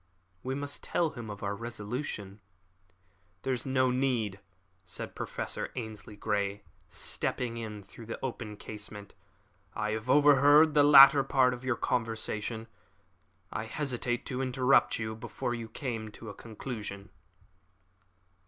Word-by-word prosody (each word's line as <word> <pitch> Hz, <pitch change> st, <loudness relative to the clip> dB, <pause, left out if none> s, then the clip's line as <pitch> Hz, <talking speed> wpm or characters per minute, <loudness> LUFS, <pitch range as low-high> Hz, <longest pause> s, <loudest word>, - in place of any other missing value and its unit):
"We 130 Hz, +4 st, -3 dB
must 140 Hz, 0 st, -3 dB
tell 165 Hz, -3 st, +1 dB
him 115 Hz, -3 st, -8 dB
our 100 Hz, 0 st, -3 dB
resolution." 110 Hz, -2 st, -5 dB, 1.0 s
"There 135 Hz, -, 0 dB
is 125 Hz, +1 st, -3 dB
no 130 Hz, -1 st, +3 dB
need," 125 Hz, -6 st, 0 dB, 0.4 s
said 85 Hz, -2 st, -5 dB
Professor -, -, -3 dB
Ainslie 110 Hz, -3 st, -6 dB
Grey, 100 Hz, -1 st, -1 dB, 0.3 s
stepping 120 Hz, -2 st, -2 dB
in 105 Hz, -3 st, -6 dB
through 110 Hz, +3 st, -12 dB
the 115 Hz, -, -4 dB
open 110 Hz, -4 st, -5 dB
casement. 105 Hz, -1 st, -8 dB, 0.6 s
"I 110 Hz, 0 st, -1 dB
have 110 Hz, +3 st, -4 dB
overheard 145 Hz, +2 st, +6 dB
the 150 Hz, -, +6 dB
latter 140 Hz, -1 st, +9 dB
part 130 Hz, -2 st, +3 dB
of 125 Hz, 0 st, -8 dB
your 130 Hz, -2 st, +1 dB
conversation. 115 Hz, -1 st, -2 dB, 0.9 s
I 110 Hz, -, -3 dB
hesitated 120 Hz, -1 st, -2 dB
to 130 Hz, -1 st, -3 dB
interrupt 130 Hz, +1 st, +3 dB
you 110 Hz, -1 st, -3 dB
before 115 Hz, +1 st, -4 dB
you 115 Hz, -2 st, -5 dB
came 115 Hz, -5 st, -4 dB
to 110 Hz, 0 st, -8 dB
a -, -, -10 dB
conclusion." 105 Hz, -3 st, -7 dB
115 Hz, 130 wpm, -30 LUFS, 105-130 Hz, 1.0 s, latter